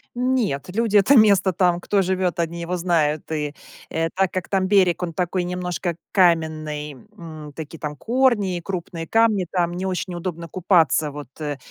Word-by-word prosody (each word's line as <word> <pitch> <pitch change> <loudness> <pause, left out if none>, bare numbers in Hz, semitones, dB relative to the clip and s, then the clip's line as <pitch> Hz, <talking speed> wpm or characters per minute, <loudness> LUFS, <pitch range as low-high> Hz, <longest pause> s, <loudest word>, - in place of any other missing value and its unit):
Нет, 245 - 0
люди 225 -2 +3
это 205 +8 +5
место 200 -5 +5
там, 175 0 +2
кто 200 +3 +1
живет, 185 -1 -1
они 170 0 -2
его 170 +2 -2
знают. 160 -4 0
И, 150 -2 -2 0.4
э, 165 0 -1
так 190 -1 +1
как 185 -2 -4
там 190 -1 +1
берег, 185 -3 +3
он 170 -2 -3
такой 180 +1 -1
немножко 180 -1 -3 0.2
каменный, 155 -4 +1 0.2
м, 155 -5 -10
такие 160 0 -7
там 150 -1 -4
корни 230 - +1
и - - -6
крупные 170 -2 -5
камни, 225 -3 +3
там 175 -2 0
не 180 +2 -4
очень 185 -1 -3
удобно 170 -1 -5
купаться, 165 -3 +2
вот, 145 -2 -8
э, 145 -2 -3
175 Hz, 175 wpm, -22 LUFS, 160-190 Hz, 0.4 s, это